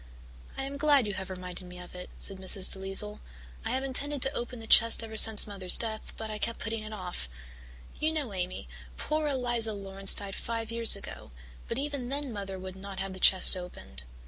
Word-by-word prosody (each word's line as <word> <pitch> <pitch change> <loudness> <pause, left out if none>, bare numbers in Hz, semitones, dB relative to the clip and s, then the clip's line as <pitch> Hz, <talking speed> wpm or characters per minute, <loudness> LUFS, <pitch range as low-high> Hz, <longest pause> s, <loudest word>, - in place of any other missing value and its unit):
"I 270 - -3
am 275 +1 -4
glad 285 -4 +4
you 205 - -3
have 190 0 -5
reminded 180 -1 -7
me 180 0 -11
of 180 0 -10
it," 180 0 -8
said 195 - 0
Mrs. 190 0 +4
DeLisle. 195 +2 +1 0.4
"I - - -3
have 265 - -1
intended 275 +1 0
to 270 - +1
open 240 -1 -3
the 225 - -9
chest 230 +1 +6
ever 220 -1 -8
since 220 -1 +6
Mother's 195 -3 +1
death 220 -2 -5
but 220 -1 -6
I 210 - -6
kept 230 +1 -1
putting 225 0 -4
it 215 0 -8
off. 180 - -5 0.7
You 310 +1 +1
know, 290 -9 -3
Amy, 180 - -4 0.3
poor 305 0 -2
Eliza 240 -5 0
Laurance 195 -1 +3
died 200 -1 -4
five 230 +1 -4
years 230 -2 +8
ago, 200 - -9 0.4
but 230 - -4
even 280 -3 -4
then 280 -2 -3
Mother 195 -2 -6
would 185 0 -8
not 195 0 -8
have 195 0 -4
the 190 - -8
chest 190 +1 +6
opened. 65 - -7
215 Hz, 205 wpm, -29 LUFS, 190-245 Hz, 0.7 s, years